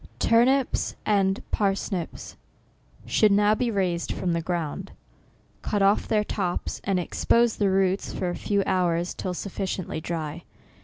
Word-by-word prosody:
TURNIPS 250 +3 +2
and 195 -2 +2
PARSNIPS 195 -3 -2 0.7
should 215 -2 +3
now 205 +1 +4
be 245 +2 0
raised 185 -5 -1
from 175 -2 -1
the 170 - 0
ground. 170 +2 -3 0.7
Cut 205 -2 0
off 200 +2 +3
their 215 -2 +2
tops, 185 -4 -3
and 195 -2 +1
expose 230 +6 +2
the 200 -2 +2
roots 190 0 +1
for 180 - -2
a - - -4
few 200 +2 0
hours, 175 -2 +1
till 180 -1 -4
sufficiently 185 -4 -4
dry. 160 0 -4
195 Hz, 140 wpm, -25 LUFS, 175-205 Hz, 0.7 s, now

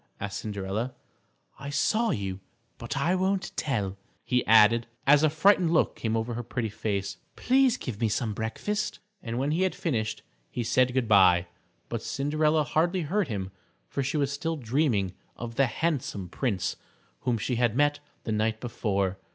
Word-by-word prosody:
asked 100 -1 -4
Cinderella. 105 +4 -3 0.6
"I 140 - -6
saw 220 +10 +1
you, 95 -2 -2 0.4
but 120 +4 -4
I 160 +6 +2
won't 190 0 0
tell," 100 -9 -1 0.3
he 125 -2 +2
added, 115 +1 +6 0.2
as 145 +1 +6
a 155 - +4
frightened 170 +2 +4
look 165 - +2
came 115 0 -1
over 115 +2 -2
her 120 - -3
pretty 120 -1 -3
face. 100 -3 -3 0.2
"Please 260 -1 +3
give 115 -3 -6
me 115 - +2
some 110 +1 -1
breakfast." 205 - -2 0.2
And 115 -1 -4
when 135 +3 0
he 165 +4 +1
had 190 -1 +1
finished 110 -10 -2 0.3
he 120 - -3
said 125 +2 +2
good 130 -3 +1
by, 90 -4 +6 0.4
but - - -3
Cinderella 155 +2 +1
hardly 170 +5 +1
heard 185 +4 0
him, 100 -5 -4 0.4
for 140 - -2
she 140 +3 -1
was 140 -1 +1
still 160 +3 -2
dreaming 115 - +1 0.2
of 115 -1 -6
the 135 +3 +3
handsome 120 - -2
prince 105 -4 -1 0.4
whom 120 -2 0
she 120 +3 -2
had 120 -2 +2
met 145 0 +3 0.2
the 110 - -3
night 110 +1 0
before. 100 -6 -1
120 Hz, 170 wpm, -27 LUFS, 110-150 Hz, 0.6 s, added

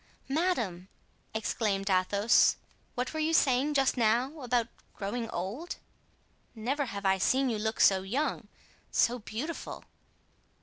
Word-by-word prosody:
"Madame!" 250 - 0 0.5
exclaimed 205 -2 -1
Athos, 200 +3 +4 0.4
"what 250 +3 -2
were 315 - -3
you 320 +1 +2
saying 275 +2 +3
just 270 -1 +2
now 245 +6 +1
about 245 -2 +1 0.3
growing 225 +3 -3
old? 210 - -4 0.8
Never 265 +6 -1
have 200 -4 -6
I 190 0 +3
seen 260 +6 +2
you 215 - -2
look 220 +1 -2
so 190 -1 +5
young, 250 +11 -2 0.4
so 245 +1 +2
beautiful!" 250 +10 -6
235 Hz, 125 wpm, -30 LUFS, 200-275 Hz, 0.8 s, so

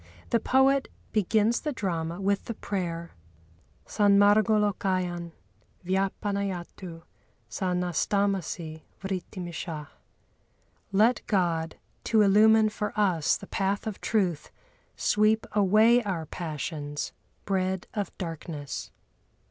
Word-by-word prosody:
The 235 - +4
poet 265 +3 +3 0.2
begins 215 +2 +2
the 300 - -2
drama 170 - -3
with 200 0 0
the 230 - -5
prayer, 170 -5 -4 0.7
"Sanmârgâlókayan 200 -4 +2 0.5
vyapanayatu 190 -2 -2 0.4
sa 185 -2 -2
nastâmasi 180 -2 -1 0.2
vritimishah" 175 -5 -5 1.0
(Let 220 +5 +4
God, 170 -5 0 0.3
to 220 -2 +4
illumine 215 +2 +6
for 210 0 -4
us 180 -7 +2
the - - -10
path 195 0 -1
of 215 -3 -5
truth, 180 -8 0 0.5
sweep 215 +1 +2
away 215 +4 +5
our 185 -7 -3
passions, 150 -2 -4 0.3
bred 190 -1 -1
of 205 -2 -2
darkness). 165 -5 -5
195 Hz, 90 wpm, -27 LUFS, 170-210 Hz, 1.0 s, illumine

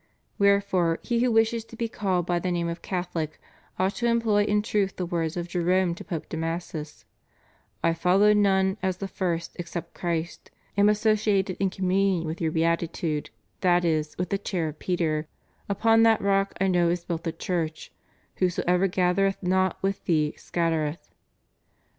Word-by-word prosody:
Wherefore 200 -4 +3
he 235 -1 0
who 245 0 +2
wishes 225 0 +2
to 230 - -13
be 230 0 -2
called 190 -6 -1
by 175 0 0
the 180 - -2
name 170 -1 -1
of 170 +1 -4
Catholic 175 -4 -3 0.4
ought 190 +2 +1
to 240 - 0
employ 225 -3 +2
in 210 0 +1
truth 205 -3 0
the 180 - -3
words 170 -1 -2
of 175 0 -3
Jerome 180 0 +1
to 170 - -9
Pope 165 -4 -5
Damasus, 165 -1 -5 0.8
"I 165 - +3
following 200 +5 +4
none 190 0 +2
as 190 -1 -1
the 195 - -4
first 170 -3 -3
except 170 0 -6
Christ 170 -1 -3 0.3
am 200 +1 +5
associated 210 -3 +2
in 195 -1 +2
communion 185 -1 +1
with 160 +2 -5
your 160 -1 +1
Beatitude, 165 -1 -1 0.3
that 175 -1 +3
is, 155 -2 0
with 180 0 -2
the 200 - 0
Chair 175 -5 -2
of 155 - -11
Peter; 160 -4 -1 0.4
upon 225 +3 +4
that 225 -1 +5
Rock 195 0 +1
I 195 - +2
know 175 -2 +3
is 175 0 -2
built 170 -2 -3
the 165 - -1
Church; 165 -1 -3 0.5
whoever 180 +1 +2
gathereth 190 +2 +1
not 185 0 +1
with 195 0 -1
thee 155 -3 +1
scattereth." 165 -2 -2
180 Hz, 165 wpm, -26 LUFS, 170-200 Hz, 0.8 s, am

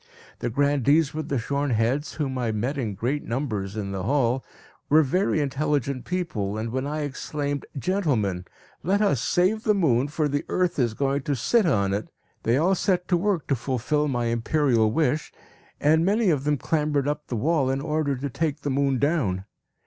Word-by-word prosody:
The 120 - -2
grandees 145 +3 +2
with 155 0 -4
the 140 - 0
shorn 140 +4 -1
heads, 125 +6 0
whom 140 -4 -2
I 120 -3 -1
met 120 +7 -2
in 115 -7 -3
great 130 +9 -1
numbers 110 -6 -3
in 100 -2 -3
the 95 -1 -3
hall, 130 +3 +1 0.5
were 155 +2 +6
very 180 +4 +1
intelligent 140 -2 -1
people, 110 - -2
and 110 +1 -3
when 130 +2 -2
I 150 +1 -2
exclaimed, 145 0 -3
"Gentlemen! 125 - 0 0.4
let 200 +5 +1
us 140 - +2
save 185 +9 +2
the 215 -2 +2
moon, 135 -8 +2
for 150 +1 0
the 145 0 -1
earth 180 -4 0
is 120 -4 +1
going 140 +2 0
to 140 +1 -1
sit 210 - +2
on 100 -9 +2
it," 105 +2 -2 0.3
they 115 +3 +2
all 175 +6 +3
set 180 -1 0
to 180 - +4
work 180 -1 0
to 140 - +1
fulfil 135 +4 -1
my 120 -4 -1
imperial 115 -1 +2
wish, 150 +3 0 0.5
and 160 +2 +4
many 205 +1 +3
of 140 -3 -1
them 150 0 +2
clambered 150 -2 0
up 150 0 -2
the 125 - -3
wall 140 +3 +1
in 135 +1 0
order 150 -1 -1
to 135 +3 -3
take 155 +1 -2
the 145 - -2
moon 135 0 +1
down. 125 - 0
140 Hz, 190 wpm, -25 LUFS, 120-155 Hz, 0.5 s, were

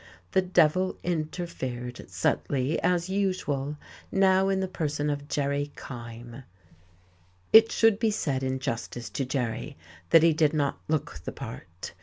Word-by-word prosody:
The 190 - +4
devil 185 0 +2
interfered 155 - -4
subtly, 130 - 0
as 175 0 +1
usual 170 -8 -1 0.3
now 190 0 +4
in 195 -1 +1
the 190 - -1
person 150 -4 -1
of 145 0 -4
Jerry 145 0 -1
Kyme. 120 0 -9 1.1
It 225 +1 +9
should 225 -2 +4
be 225 - +2
said 140 -10 -1
in 130 0 -1
justice 120 -3 -4
to 135 - -2
Jerry 120 - -3 0.3
that 165 - +7
he 165 -1 +6
did 155 -1 +2
not 145 -2 0
look 155 -2 -2
the - - -4
part. 85 +7 -8
145 Hz, 140 wpm, -27 LUFS, 130-180 Hz, 1.1 s, It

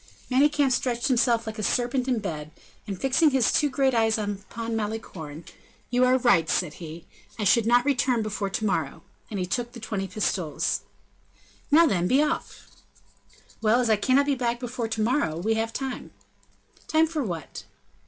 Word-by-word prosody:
Manicamp 285 +1 +3
stretched 245 -1 0
himself 240 -2 +2
like 220 0 -6
a - - -1
serpent 245 +4 0
in 255 - +2
his 220 - -4
bed, 155 -5 -5 0.4
and 195 -3 -5
fixing 275 +4 +3
his 265 -4 +2
two 295 - +3
great 270 -1 +1
eyes 225 -1 +2
upon 215 +2 -4
Malicorne, 185 -8 -5 0.5
"You 250 +1 +4
are 255 +1 +4
right," 195 -11 +3
said 175 -4 0
he; 165 0 -8 0.3
"I 215 - -2
could 225 +2 +4
not 245 +1 +4
return 255 -4 +1
before 210 -2 -3
to 205 +3 -2
morrow;" 160 -9 -2 0.3
and 205 - -4
he 180 - -1
took 240 +6 -3
the 235 - -9
twenty 200 -3 -3
pistoles. 185 -4 -1 0.9
"Now, 325 +3 +6
then, 180 - +1
be 260 +6 +3
off!" 305 +2 -4 0.9
"Well, 225 +2 +3
as 240 -3 +2
I - - +6
cannot 260 +7 +2
be 285 - +1
back 240 -2 -1
before 245 -1 -4
to 220 -1 -3
morrow, 235 - 0
we 215 +6 0
have 225 +1 -1
time." 265 +1 -5 0.8
"Time 315 0 +4
for 315 -2 -3
what?" 170 - -6
230 Hz, 180 wpm, -26 LUFS, 200-255 Hz, 0.9 s, Now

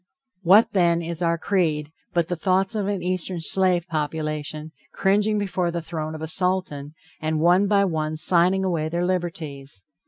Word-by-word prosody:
What, 195 +5 +5
then, 170 -3 +2
is 170 +1 -4
our 170 -1 +1
creed, 155 -5 -1 0.2
but 170 -2 0
the 180 - -2
thoughts 190 +4 +1
of 210 -3 -2
an 200 -3 -2
eastern 185 0 -2
slave 180 +1 +1
population, 155 -1 -4 0.2
cringing 210 +2 +1
before 185 -3 -1
the 170 0 -3
throne 160 -1 -5
of 155 - -7
a - - -3
Sultan, 175 -5 -1 0.3
and 155 0 -1
one 180 +5 +4
by 200 -1 +3
one 155 -3 -2
signing 180 +4 +3
away 165 -4 -1
their 170 +2 -1
liberties? 155 - -4
170 Hz, 165 wpm, -23 LUFS, 155-185 Hz, 0.3 s, What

